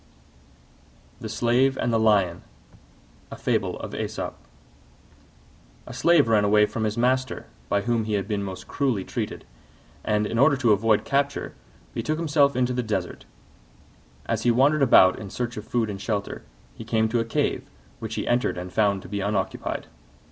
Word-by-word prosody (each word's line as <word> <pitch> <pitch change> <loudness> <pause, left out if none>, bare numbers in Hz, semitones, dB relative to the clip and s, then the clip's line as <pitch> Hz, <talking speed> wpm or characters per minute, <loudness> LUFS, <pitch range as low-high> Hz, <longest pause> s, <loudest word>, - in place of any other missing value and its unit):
THE - - -6
SLAVE 130 +3 +2
AND 120 - -1
THE 115 - +3
LION 100 -6 +2 0.9
A - - -7 2.6
Slave 170 -6 +4
ran 110 -2 +3
away 105 +1 +4
from 110 +1 -4
his 110 +1 -2
master, 130 +2 0 0.2
by 100 - +1
whom 115 0 0
he 110 - -3
had 100 -1 -1
been 105 -2 -1
most 95 -2 -7
cruelly 130 -9 -1
treated, - - -5 0.6
and, 105 0 +1
in 115 +2 -2
order 140 +1 +5
to 120 -4 +2
avoid 105 +1 +2
capture, 140 0 -1 0.4
betook 155 0 -2
himself 145 -4 +2
into 125 0 +1
the 125 - 0
desert. 105 -6 -4 1.0
As - - -1
he 120 - +2
wandered 140 +6 +3
about 95 -8 +6
in 100 - -7
search 120 +3 -4
of 105 - -8
food 120 -2 0
and 100 -2 -6
shelter, 100 -2 -3 0.3
he - - -9
came 110 -1 +1
to 120 +1 +1
a - - +1
cave, 115 - -2 0.3
which 110 -1 -5
he - - -3
entered 120 -6 +1
and 90 0 -7
found 100 -3 +1
to - - -10
be 100 -1 -3
unoccupied. 100 0 -2
115 Hz, 160 wpm, -25 LUFS, 105-125 Hz, 2.6 s, about